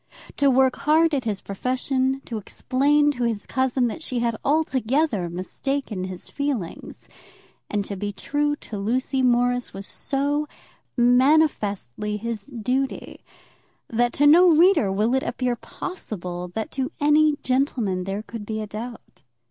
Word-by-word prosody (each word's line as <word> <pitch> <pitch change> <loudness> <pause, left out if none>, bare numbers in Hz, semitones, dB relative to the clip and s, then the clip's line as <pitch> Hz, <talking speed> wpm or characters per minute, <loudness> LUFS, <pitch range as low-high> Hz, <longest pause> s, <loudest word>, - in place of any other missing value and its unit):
To 280 - +4
work 260 0 +3
hard 320 +2 +3
at 265 -4 0
his 210 -3 -2
profession; 260 +5 -1
to 225 -3 -4
explain 290 +7 +2
to 250 -4 -3
his 225 -3 -1
cousin 260 -1 +1
that 240 +7 -3
she 255 -5 -4
had 235 -1 0
altogether 270 - +1
mistaken 190 +4 -3
his 185 -1 -7
feelings; 275 -12 -4 0.6
and 205 -1 -1
to 200 - -5
be 205 +2 -3
true 290 +8 -1
to 215 -7 -8
Lucy 255 +6 0
Morris 245 -1 +1
was 195 0 -7
so 290 +5 -1 0.5
manifestly 240 - +2
his 230 0 -5
duty, 260 +1 -3 0.7
that 240 +1 +1
to 290 - +2
no 345 +5 +7
reader 330 - +5
will 210 +5 +1
it 265 - +2
appear 245 0 -1
possible 180 - -6
that 220 - -3
to 265 -1 -2
any 300 +1 +4
gentleman 245 -8 0
there 195 +2 -3
could 225 -1 -7
be 220 +1 -4
a 215 - -3
doubt. 225 +3 -9
250 Hz, 145 wpm, -24 LUFS, 210-280 Hz, 0.7 s, no